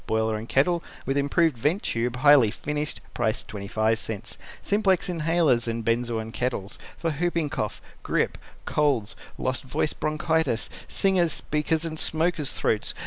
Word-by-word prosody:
Boiler 110 0 +1
A 110 +1 -5
kettle 170 +7 +2 0.2
with 135 - 0
improved 145 +2 +2
vent 150 - 0
tube, 120 +1 -1
highly 135 -3 +6
finished 150 +6 -3
Price 110 -3 0
.25 110 +2 -2 0.3
SIMPLEX 195 -3 +2
INHALERS 160 -7 +2
and 115 -1 -2
BENZOIN 115 -1 0
KETTLES 120 -5 -2 0.2
For 165 - -1
Whooping 165 -1 -1
Cough, 105 - -3 0.2
Grip, - - 0 0.3
Colds, 140 -8 +1 0.2
Lost 130 0 -1
Voice 135 +3 -1
Bronchitis, 155 -4 0 0.2
Singers', 185 -5 +2
Speakers' 155 +2 0
and 160 -1 -4
Smokers' 160 -2 +1
Throats. 105 - 0
140 Hz, 135 wpm, -26 LUFS, 115-160 Hz, 0.3 s, highly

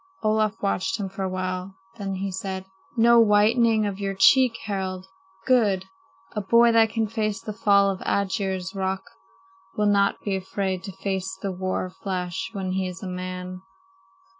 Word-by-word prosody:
Olaf 215 0 +1
watched 200 +1 0
him 195 -2 -3
for 195 +1 -7
a 190 - -1
while, 185 +1 -4 0.2
then 195 -1 -3
he 195 +1 -3
said: 190 0 -4 0.3
"No 235 +1 +6
whitening 220 +1 +4
of 200 -1 -3
your 195 -1 -2
cheek, 255 +4 +5
Harald? 190 -3 -3 0.4
Good! 210 -8 +3 0.5
A 210 - -3
boy 235 +4 +5
that 225 -1 +5
can 225 0 0
face 215 -1 -2
the 215 - -6
fall 200 -1 +4
of 190 - -6
Aegir's 190 -1 -1
Rock 190 -1 -2 0.7
will 210 - +2
not 200 -1 +3
be 200 -2 -1
afraid 190 0 -2
to 195 - -6
face 190 0 -3
the 195 - -1
war 185 0 -2
flash 185 -1 -4
when 190 -2 -3
he 190 0 -1
is 185 +2 -8
a - - -4
man." 185 0 -5
195 Hz, 165 wpm, -25 LUFS, 185-210 Hz, 0.7 s, No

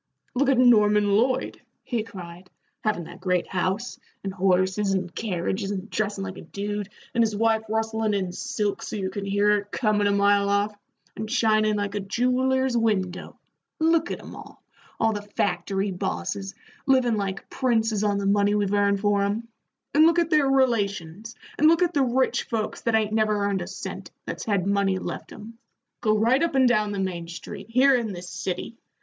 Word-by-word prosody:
"Look 270 +2 +2
at 270 - +3
Norman 210 -4 +5
Lloyd," 255 +4 0 0.2
he 235 -3 -2
cried, 185 -4 -10 0.3
"havin' 210 -5 0
that 175 +3 -12
great 180 -2 +1
house, 190 +6 -2 0.2
and 195 -1 -4
horses 190 +1 +1
and 180 -2 -2
carriages, 195 -1 -2
and 200 +1 -5
dressin' 205 -2 -2
like 190 -1 -6
a - - -8
dude, 205 +3 -4 0.2
and 235 - +2
his 220 -2 +1
wife 225 +1 +2
rustlin' 220 -1 0
in 190 -2 -1
silks 210 -2 -3
so - - -5
you 190 -2 -2
can 200 +1 -5
hear 200 +1 +1
her 210 -1 +3
comin' 210 -3 +1
a - - +2
mile 200 0 +3
off, 200 +1 +1 0.4
and 215 +1 -5
shinin' 215 -3 +2
like 205 -1 -2
a 205 - -1
jeweller's 255 +5 +1
window 200 -6 -1 0.4
look 325 +1 +2
at - - -4
'em - - -10
all - - -13 0.4
all 225 0 +2
the 205 - -4
factory 200 0 -1
bosses 95 - -4 0.3
livin' 255 -4 +3
like 195 -2 -3
princes 225 -4 +1
on 205 -1 +1
the 200 - -2
money 205 +1 +3
we've 205 -1 0
earned 200 -1 +2
for 205 -1 +2
'em; 205 +4 -1 0.5
and 310 +3 +6
look 335 +1 +3
at 340 -1 +1
their 300 -3 +4
relations, 215 -6 0 0.2
and 310 - +6
look 335 +2 +5
at 350 0 0
the 285 - +2
rich 255 +1 +1
folks 225 -4 -3
that 230 -1 +1
ain't 215 -1 +1
never 215 -2 +1
earned 200 -2 0
a 175 - -5
cent, 190 - -7 0.2
that's - - -5
had 200 -4 0
money 200 -1 +1
left - - -6
'em. 225 +2 -11 0.4
Go 215 -1 +2
right 235 +6 +3
up 335 -4 0
and 260 -1 +5
down 215 -3 +2
the 200 - -3
Main 175 -3 -3
Street, 175 +3 -8
here 260 +3 +5
in 230 -4 -1
this 175 0 -8
city. 190 +5 -4
210 Hz, 190 wpm, -25 LUFS, 195-230 Hz, 0.5 s, and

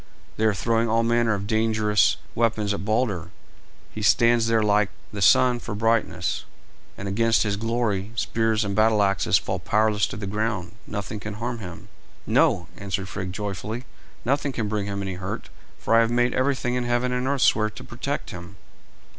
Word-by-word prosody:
They 110 - 0
are 110 - +4
throwing 115 +2 +1
all 115 +1 +2
manner 115 -1 +2
of 100 0 -4
dangerous 110 -1 +2 0.2
weapons 110 -3 +1
at 95 - -4
Balder. 105 -6 0 0.6
He 110 - -7
stands 115 +2 +4
there 115 -1 +3
like 105 -1 +3 0.2
the 100 - -5
sun 125 +6 +5
for 105 - -6
brightness, 115 +1 0 0.5
and 100 - -5
against 115 +3 +2
his 105 -2 0
glory, 110 -2 -1
spears 110 -2 0
and 100 -1 -2
battle 110 -1 +4
axes 100 0 +3
fall - - -3
powerless 105 -1 +2
to - - -7
the 105 - -5
ground. 105 -2 -2 0.2
Nothing 100 +1 -5
can 105 0 -6
harm 120 +2 -4
him." 90 -5 -9 0.4
"No," 85 -3 +2
answered 95 -1 -3
Frigg 95 -2 -4
joyfully; 105 +4 -4 0.4
"nothing 140 +3 +1
can 115 -3 -2
bring 105 -1 -2
him 100 0 -3
any 95 -1 -3
hurt, 95 +3 -5 0.3
for - - -1
I 115 - +7
have 115 0 +3
made 120 +1 +2
everything 130 -2 0
in 125 0 0
heaven 120 +1 0
and 125 +1 -1
earth 140 -1 +1
swear 110 -1 +3
to 105 - -11
protect - - -4
him." 90 +2 -9
110 Hz, 180 wpm, -24 LUFS, 100-115 Hz, 0.6 s, I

